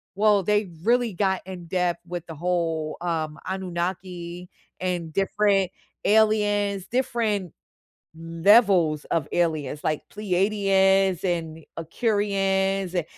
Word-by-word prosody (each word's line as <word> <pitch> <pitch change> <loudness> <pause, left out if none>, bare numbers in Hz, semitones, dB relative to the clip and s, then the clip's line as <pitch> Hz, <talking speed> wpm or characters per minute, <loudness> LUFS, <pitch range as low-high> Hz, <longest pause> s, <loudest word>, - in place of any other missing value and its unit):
well, 205 -1 +3
they 210 -2 +1
really 240 -2 +2
got 190 0 0
in 180 -2 -8
depth 180 0 0
with 175 -1 -5
the 165 - -8
whole, 165 -2 -1
um, 160 -3 -2
Anunnaki, 180 -1 -4 0.3
and 175 -3 -3
different 195 -1 +1 0.3
aliens, 205 -2 +2
different 230 - -1 0.6
levels 165 -1 +3
of 160 -4 -1
aliens, 155 -4 -1
like, 155 -1 0
Pleiadians, 195 -2 +2
and 165 -3 -2
Aqirians 195 0 0
and 175 -3 0
185 Hz, 105 wpm, -24 LUFS, 170-205 Hz, 0.6 s, well